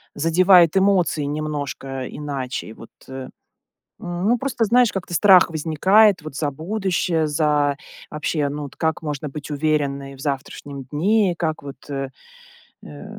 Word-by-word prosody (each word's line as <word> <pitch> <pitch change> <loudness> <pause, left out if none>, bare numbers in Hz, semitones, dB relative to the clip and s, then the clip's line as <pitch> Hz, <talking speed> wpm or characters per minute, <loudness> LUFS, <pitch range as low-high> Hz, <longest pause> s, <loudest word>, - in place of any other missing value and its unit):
задевает 170 +2 +5
эмоции 190 -5 +2
немножко 145 -3 -4
иначе. 135 -6 -5
Вот, 115 - -14 0.2
э, 130 0 -7 0.7
ну, 180 +7 -1
просто 245 -2 -1
знаешь, 240 +1 +4
как-то 185 -2 -5
страх 185 -1 +6
возникает 180 +5 +3
вот 155 -2 -8
за 145 -1 -1
будущее. 175 0 -1
За, 150 -1 +1 0.3
вообще, 150 -1 -1
ну, 145 +1 -5
от 140 - -15
как 160 +1 -1
можно 150 -1 -4
быть 145 +1 -8
уверенной 140 -2 -1
в - - -14
завтрашнем 140 0 -5
дне. 185 - +1
Как 155 -2 -2
вот, 140 0 -11
э, 135 -1 -3 0.8
э, 75 -1 -10
155 Hz, 135 wpm, -21 LUFS, 140-180 Hz, 0.8 s, страх